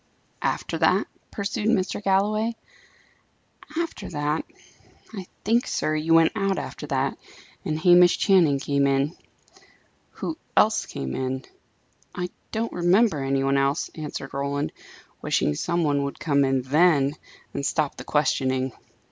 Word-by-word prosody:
"After - - -2
that?" - - +3 0.2
pursued 205 +1 -3
Mr. 205 -2 0
Galloway. 215 +4 +1 1.2
"After 335 -1 -3
that? 150 0 -1 0.7
I 190 -4 -7 0.2
think, 230 +4 +2
sir, 155 - -1
you 160 +2 +2
went 165 0 +5
out 195 -1 0
after - - -6
that, - - -1 0.4
and 155 -6 -2
Hamish 175 +1 +6
Channing 175 -8 +4
came 140 0 +1
in." 140 +4 +1 1.0
"Who 320 0 -5 0.2
else 215 +1 +4
came 65 -1 -5
in?" 130 0 -3 0.7
"I 180 0 -3 0.2
don't 225 +1 -2
remember 175 -2 +3
any 135 0 0
one 135 0 +2
else," 140 +1 0
answered 150 -3 -6
Roland, 140 +1 -2 0.5
wishing - - +1
some 170 - -1
one 145 -2 +1
would 140 - -5
come 140 -3 +2
in 135 -1 +1
then, 145 0 +3 0.4
and - - -3
stop 150 0 0
the - - -7
questioning. 130 -3 0
155 Hz, 135 wpm, -25 LUFS, 140-190 Hz, 1.2 s, Hamish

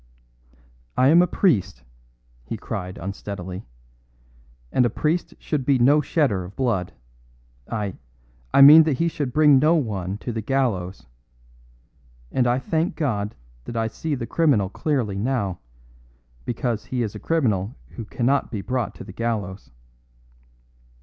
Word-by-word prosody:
"I 130 +2 +5
am 170 +3 +7
a 180 - +3
priest," 100 - +1 0.6
he - - -5
cried 90 +1 -5
unsteadily, 95 -2 -6 1.0
"and 125 - +3
a 120 - +2
priest 155 +9 -1
should 150 -4 -2
be 135 +1 +3
no 140 +5 +5
shedder 135 - 0
of 90 +3 -11
blood. 115 -9 -1 0.8
I 105 -4 -3 0.6
I - - +5
mean 150 +3 +11
that 150 -5 0
he 170 - +1
should 145 -5 -3
bring 150 -1 +5
no 155 +4 +4
one 100 - -2
to 120 - -5
the 110 -1 -3
gallows. 100 - -1 1.3
And 125 -2 +1
I 120 +1 +2
thank 160 +8 -1
God 105 -10 -2 0.3
that 120 - -6
I 115 - +1
see 145 +7 -3
the 120 - -4
criminal 125 - +2
clearly 115 -6 -1
now 105 -6 -1 0.9
because 120 -2 -2
he 125 -2 -2
is 105 - -4
a 105 - -8
criminal 115 - 0
who 115 - -8
cannot 130 +5 0
be 105 -5 -4
brought 125 +1 -2
to - - -9
the 95 - -11
gallows." 105 -4 -3
120 Hz, 145 wpm, -23 LUFS, 100-140 Hz, 1.3 s, mean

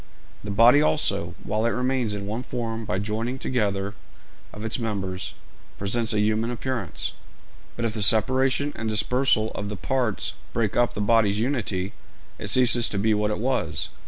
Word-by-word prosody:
The 100 - -6
body 115 +8 +6
also, 155 - +1
while 110 +2 -1
it 120 - -1
remains 125 -4 0
in 100 -1 -5
one 110 +4 -3
form 115 -3 -4
by 95 - -1
the 100 - -2
joining 115 +5 -2
together 100 -6 -1 0.6
of 105 +1 -7
its 110 - -1
members, 95 -5 -3 0.4
presents 110 +4 0
a 105 - +1
human 110 +2 +1
appearance; 120 - -3 0.6
but 120 - -2
if 110 - -1
the 110 - -2
separation 130 +6 +3
and 115 - -3
dispersal 110 0 +2
of 100 0 -5
the 105 - -5
parts 115 +4 -1 0.2
break 110 -3 0
up 120 0 +2
the 105 - -2
body's 105 -1 +3
unity, 105 -6 -1 0.5
it - - -5
ceases 120 -2 +5
to 100 - -3
be 110 +2 +2
what 105 0 +1
it 105 - -1
was. 130 +4 -1
110 Hz, 175 wpm, -25 LUFS, 105-120 Hz, 0.6 s, body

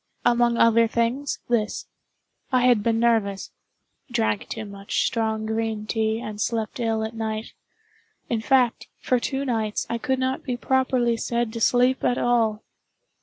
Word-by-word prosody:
Among 240 0 +3
other 230 0 +5
things, 235 +5 -1
this: 220 -3 -1 0.7
I 255 -1 +3
had 245 -3 +4
been 225 +1 +1
nervous—drank 200 - -2
too 220 -1 -5
much 200 0 -2
strong 220 -1 -1
green 220 -1 -2
tea, 220 0 0
and 215 -2 -6
slept 225 +1 -2
ill 225 -2 0
at 220 +1 -4
night—in 225 - -7
fact, 250 -1 +2
for 250 - +1
two 270 +3 -2
nights 220 -4 -1
I 235 - -1
could 265 0 0
not 260 0 -1
be 250 -3 -3
properly 255 -2 +1
said 235 -1 -1
to 230 - -5
sleep 250 +3 +3
at 245 - +2
all. 225 -3 +1
230 Hz, 145 wpm, -24 LUFS, 220-245 Hz, 0.7 s, other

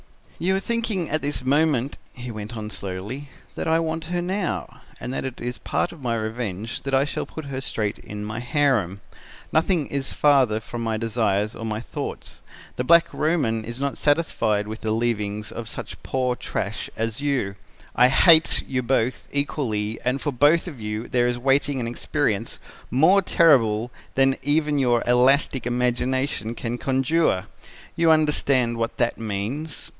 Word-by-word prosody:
"'You 190 +3 +1
are - - +1
thinking 220 -5 -1
at 155 - +1
this 140 -2 -1
moment,' 140 -2 +2 0.2
he 125 0 -7
went 110 +1 -7
on 105 0 -5
slowly, 100 +10 -6 0.2
'that - - -4
I 160 0 +4
want 160 0 -2
her 175 +1 -2
now, 190 +1 -3 0.2
and 125 - -5
that - - -2
it 130 -2 -5
is 120 0 -4
part - - -1
of 165 - -13
my 120 -2 -1
revenge 110 -1 -4
that 135 0 -1
I 135 +1 +3
shall 145 - -4
put 160 - -8
her 135 -1 -4
straight 105 -6 -3
in 105 0 -7
my 110 +2 -4
harem. 120 - +1 0.5
Nothing 165 -1 +2
is 140 -1 -3
farther 135 -7 +4
from 115 +2 -7
my 110 -1 -1
desires 110 -2 0
or - - -7
my 110 -1 -2
thoughts. 115 - -6 0.4
The 125 - 0
Black 170 +5 +5
Roman 140 -9 0
is 120 +3 -7
not 140 0 -2
satisfied 115 -9 +1
with 110 +1 -6
the 110 - -2
leavings 105 -2 -1
of 115 -1 -6
such - - -7
poor 130 -1 -1
trash 105 -3 -4
as 115 +3 -2
you. 135 -9 0 0.4
I 125 +2 +6
hate 160 +5 +6
you 130 -1 -1
both 125 0 0
equally 115 -7 -2
and 125 +2 0
for 145 - -2
both 145 +7 +3
of 140 -9 -8
you 105 +2 -4
there 120 -1 +2
is 120 0 -1
waiting 135 +2 +1
an 115 - -2
experience 115 -3 -1 0.3
more 160 - +5
terrible 125 - +3 0.2
than 135 0 +3
even 150 +1 +2
your 120 -3 +2
elastic 130 +1 +3
imagination 125 -1 0
can 120 +1 -4
conjure. 135 - +1 0.5
You 165 0 +3
understand 140 -6 +2
what 115 0 -2
that 120 - 0
means!' 115 +9 -4
125 Hz, 170 wpm, -24 LUFS, 115-145 Hz, 0.5 s, I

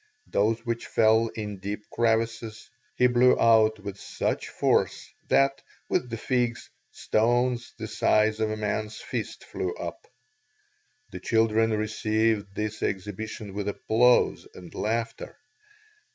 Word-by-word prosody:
Those 110 +3 0
which 115 0 -3
fell 110 +1 +4
in 105 -3 -5
deeper 100 +2 -5
crevices, 115 -1 -1 0.2
he 125 - +3
blew 125 +1 +4
out 110 -1 +5
with 100 0 -8
such - - -3
force - - 0
that, 135 0 +3 0.3
with 125 - 0
the 115 - -4
figs, 120 0 -1 0.2
stones 120 +2 0
the - - -5
size 110 0 +2
of 110 -1 +1
a 110 - -3
man's 105 0 -2
fist - - -5
flew 90 - -4
up. 85 -1 -7 1.0
The 90 - -7
children 115 +2 +2
received 110 -1 0
this 105 0 -3
exhibition 105 +1 -4
with 100 0 -3
applause 120 +4 +2
and 90 -1 -11
laughter. 115 - -3
110 Hz, 125 wpm, -26 LUFS, 105-115 Hz, 1.0 s, out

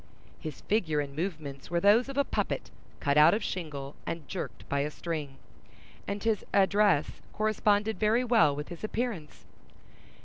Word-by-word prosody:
His 155 -3 -7
figure 170 -8 +1
and 140 -1 -4
movements 155 -5 -5
were 170 0 +1
those 215 +8 +4
of 275 - -6
a 280 - +4
puppet - - -2 0.3
cut 140 -1 +1
out 160 +5 +7
of 220 - -2
shingle 145 -6 -5
and 165 -3 -5
jerked - - -6
by 140 - 0
a 145 +1 0
string; 150 -4 -5 0.7
and 200 0 -3
his 225 -3 +1
address 200 -5 +3
corresponded 215 0 +1
very 225 +3 +3
well 225 - +4
with 150 +1 -6
his 175 +2 -9
appearance. 215 -8 -4
175 Hz, 160 wpm, -29 LUFS, 150-215 Hz, 0.7 s, out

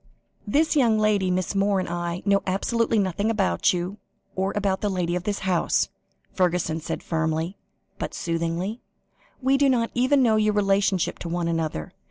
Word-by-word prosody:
"This 310 +9 +2
young 235 -6 +4
lady, 210 -3 +2
Miss 180 +1 -1
Moore, 200 0 +2
and 185 - -2
I, 175 +1 -3
know 200 -1 +3
absolutely 225 +4 +1
nothing 200 +1 0
about 210 -4 +2
you, 180 +3 -3 0.4
or 190 +1 0
about 200 -2 0
the 210 - 0
lady 180 -2 -1
of 180 0 -3
this 205 -1 -2
house," 180 -3 +1 0.4
Fergusson 175 -3 0
said 160 - -4
firmly, 160 +2 -1 0.4
but - - -4
soothingly. 170 +6 -2 0.6
"We 270 +1 +4
do 280 -1 +4
not 235 -3 +1
even 260 +2 +3
know 220 -3 +4
your 215 0 +2
relationship 195 -2 +1
to 170 - -5
one 170 0 -1
another. 160 - -2
195 Hz, 170 wpm, -24 LUFS, 175-215 Hz, 0.6 s, young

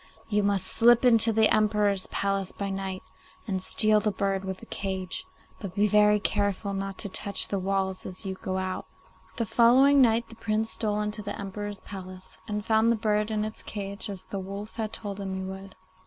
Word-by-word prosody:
You 210 -1 +2
must 200 -1 +2
slip 240 +1 +5
into 230 -2 +5
the 220 0 +4
Emperor's 210 -2 +2
palace 195 -1 -1
by 200 -1 -4
night 195 -1 -4 0.4
and 190 -3 -1
steal 215 +2 +3
the 210 - 0
bird 195 -1 -1
with 190 -1 -4
the - - -13
cage; 190 -2 -4 0.3
but 190 -3 -7
be 205 - +3
very 210 0 +5
careful 200 -1 -1
not 195 0 -4
to 205 - -1
touch 200 +1 -1
the 200 - -1
walls 190 0 -1
as 185 +3 -7
you 190 - -2
go 190 0 -4
out.' 185 0 -3 0.5
The 230 - 0
following 260 +6 +5
night 230 -1 +3
the 225 - -13
Prince 220 0 -1
stole 210 -1 -1
into 210 +1 -1
the 205 - -5
Emperor's 205 0 -5
palace, 185 -1 -8
and 210 -1 -3
found 220 +1 +3
the - - +3
bird 210 -1 0
in 215 -1 -1
its 215 - -6
cage 200 +1 -5
as 195 -2 -4
the 200 - -5
wolf 200 +4 -7
had 220 -2 -2
told 205 -3 -5
him 190 -1 -4
he 190 - -4
would. 190 0 -8
205 Hz, 200 wpm, -27 LUFS, 195-215 Hz, 0.5 s, slip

